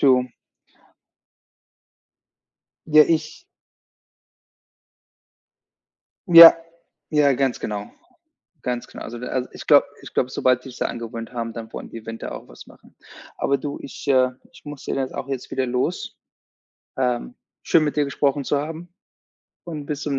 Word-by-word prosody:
Du 130 Hz, -2 st, +4 dB, 2.6 s
Ja, 155 Hz, -1 st, +7 dB
ich 160 Hz, -, -2 dB, 2.8 s
Ja. 170 Hz, -1 st, +12 dB, 0.6 s
Ja, 145 Hz, -2 st, +4 dB
ganz 130 Hz, -1 st, 0 dB
genau, 105 Hz, -1 st, -5 dB, 0.7 s
ganz 125 Hz, -1 st, -3 dB
genau. -, -, -10 dB
Also, 120 Hz, +1 st, -7 dB
da 125 Hz, +1 st, -3 dB
ich -, -, -11 dB
glaube -, -, +6 dB, 0.2 s
ich -, -, -12 dB
glaube, 125 Hz, -, 0 dB
sobald 130 Hz, -1 st, +1 dB
die 130 Hz, -, -9 dB
sich's 125 Hz, -, -12 dB
da -, -, 0 dB
angewöhnt 115 Hz, +1 st, -6 dB
haben, 115 Hz, -1 st, -4 dB
dann 115 Hz, 0 st, -9 dB
wollen -, -, -7 dB
die -, -, -9 dB
im 110 Hz, -, -11 dB
Winter 115 Hz, 0 st, -6 dB
auch -, -, -9 dB
was -, -, -14 dB
machen. -, -, -20 dB, 0.4 s
Aber 140 Hz, -, +1 dB
du, 145 Hz, +1 st, -5 dB
ich 140 Hz, -, -10 dB
äh, 130 Hz, -2 st, +4 dB, 0.2 s
ich -, -, -17 dB
muss 145 Hz, -2 st, -9 dB
da -, -, -2 dB
jetzt 135 Hz, -1 st, -3 dB
auch 135 Hz, -, -5 dB
wieder 135 Hz, 0 st, -3 dB
los. 125 Hz, 0 st, -2 dB, 0.8 s
Ähm, 125 Hz, -, -1 dB, 0.3 s
schön, 160 Hz, -, +4 dB
mit 150 Hz, 0 st, -1 dB
dir 150 Hz, -, +3 dB
gesprochen 140 Hz, 0 st, 0 dB
zu 145 Hz, -, 0 dB
haben 165 Hz, +3 st, -8 dB, 0.7 s
und 155 Hz, -4 st, -7 dB
bis 150 Hz, -1 st, -4 dB
zum 140 Hz, -2 st, -1 dB
135 Hz, 150 wpm, -22 LUFS, 125-150 Hz, 2.8 s, Ja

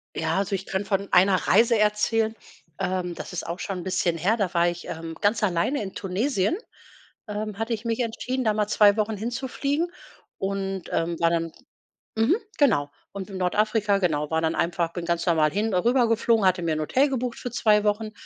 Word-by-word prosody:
Ja, 160 Hz, +2 st, -1 dB
also 195 Hz, 0 st, 0 dB
ich 190 Hz, -, -5 dB
könnte 195 Hz, +1 st, -3 dB
von 195 Hz, -1 st, -1 dB
einer 190 Hz, +1 st, +5 dB
Reise 230 Hz, +2 st, +5 dB
erzählen. 220 Hz, +1 st, +1 dB, 0.4 s
Ähm, 180 Hz, -2 st, -2 dB
das -, -, -8 dB
ist 180 Hz, -, -4 dB
auch 170 Hz, +2 st, -5 dB
schon 185 Hz, +2 st, -4 dB
’n -, -, -6 dB
bisschen 180 Hz, -2 st, 0 dB
her. 205 Hz, +8 st, +1 dB
Da 195 Hz, -4 st, -1 dB
war 170 Hz, 0 st, +3 dB
ich, 175 Hz, 0 st, -7 dB
ähm, 165 Hz, 0 st, -6 dB
ganz 210 Hz, +1 st, +2 dB
alleine 195 Hz, +9 st, +1 dB
in 195 Hz, -, -7 dB
Tunesien, 205 Hz, -, 0 dB, 0.7 s
ähm, 210 Hz, -1 st, -4 dB
hatte 225 Hz, +1 st, -1 dB
ich 225 Hz, +1 st, -5 dB
mich 230 Hz, +1 st, -1 dB
entschieden, 250 Hz, +3 st, -2 dB
da 215 Hz, -, +3 dB
mal 210 Hz, -1 st, 0 dB
2 210 Hz, -1 st, +5 dB
Wochen 215 Hz, -1 st, 0 dB
hinzufliegen 270 Hz, -, -2 dB, 0.5 s
und, 195 Hz, -1 st, -3 dB
ähm, 165 Hz, 0 st, -1 dB
war 170 Hz, 0 st, +3 dB
dann 165 Hz, -1 st, -1 dB, 0.6 s
mhm, 225 Hz, -, +3 dB, 0.2 s
genau. 200 Hz, -, +3 dB, 0.2 s
Und 200 Hz, 0 st, -6 dB
in 190 Hz, -, -6 dB
Nordafrika, 210 Hz, +2 st, +1 dB
genau 150 Hz, -5 st, 0 dB
war 160 Hz, 0 st, +1 dB
dann 160 Hz, 0 st, 0 dB
einfach, 170 Hz, 0 st, -1 dB
bin 175 Hz, -2 st, -5 dB
ganz 170 Hz, 0 st, -1 dB
normal 160 Hz, -3 st, +3 dB
hin 210 Hz, +1 st, -1 dB
äh, -, -, +3 dB
rübergeflogen, 230 Hz, -1 st, +2 dB
hatte 185 Hz, -1 st, +3 dB
mir 160 Hz, -2 st, 0 dB
’n 155 Hz, -, -2 dB
Hotel 265 Hz, -, +2 dB
gebucht 250 Hz, -2 st, -2 dB
für 245 Hz, -, -5 dB
2 210 Hz, -3 st, +3 dB
Wochen 215 Hz, +1 st, 0 dB
200 Hz, 200 wpm, -25 LUFS, 175-225 Hz, 0.7 s, einer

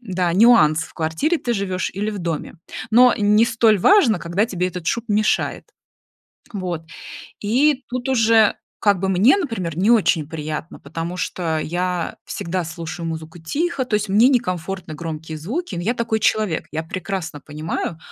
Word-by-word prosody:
Да, 185 Hz, -6 st, -1 dB
нюанс- 170 Hz, -7 st, +5 dB
в -, -, -15 dB
квартире 160 Hz, -, 0 dB
ты 240 Hz, -, -2 dB
живешь 195 Hz, -4 st, -2 dB
или 205 Hz, +3 st, -2 dB
в 205 Hz, -, -5 dB
доме. 165 Hz, -3 st, -4 dB, 0.4 s
Но 245 Hz, +2 st, +7 dB
не 210 Hz, +2 st, +4 dB
столь 225 Hz, -3 st, +3 dB
важно, 255 Hz, -, +5 dB
когда 170 Hz, +7 st, 0 dB
тебе 180 Hz, -4 st, -1 dB
этот 180 Hz, -2 st, -8 dB
шум 235 Hz, -, 0 dB
мешает. 210 Hz, 0 st, 0 dB, 0.9 s
Вот. 180 Hz, -5 st, -4 dB, 0.6 s
И 260 Hz, +6 st, +2 dB
тут 250 Hz, +1 st, -3 dB
уже 225 Hz, -4 st, +4 dB, 0.2 s
как 200 Hz, -3 st, +3 dB
бы 190 Hz, -, -1 dB
мне, 195 Hz, -, +4 dB
например, 185 Hz, -, -3 dB
не 205 Hz, +5 st, +3 dB
очень 170 Hz, -9 st, +3 dB
приятно, 155 Hz, 0 st, -5 dB
потому 165 Hz, +4 st, -6 dB
что 175 Hz, -3 st, -2 dB
я 175 Hz, +2 st, -2 dB
всегда 175 Hz, +1 st, -3 dB
слушаю 165 Hz, 0 st, -6 dB
музыку 160 Hz, +1 st, -6 dB
тихо, 270 Hz, -, -2 dB
то 225 Hz, -, -2 dB
есть 210 Hz, -1 st, 0 dB
мне 220 Hz, +6 st, +5 dB
некомфортны 190 Hz, -, -2 dB
громкие 160 Hz, 0 st, -6 dB
звуки, 265 Hz, -, -4 dB
но 170 Hz, -, -3 dB
я 220 Hz, +8 st, 0 dB
такой 230 Hz, -2 st, -1 dB
человек. 215 Hz, -8 st, +1 dB
Я 160 Hz, +2 st, -3 dB
прекрасно 165 Hz, -2 st, -5 dB
понимаю, 155 Hz, +2 st, -4 dB
185 Hz, 160 wpm, -21 LUFS, 165-225 Hz, 0.9 s, Но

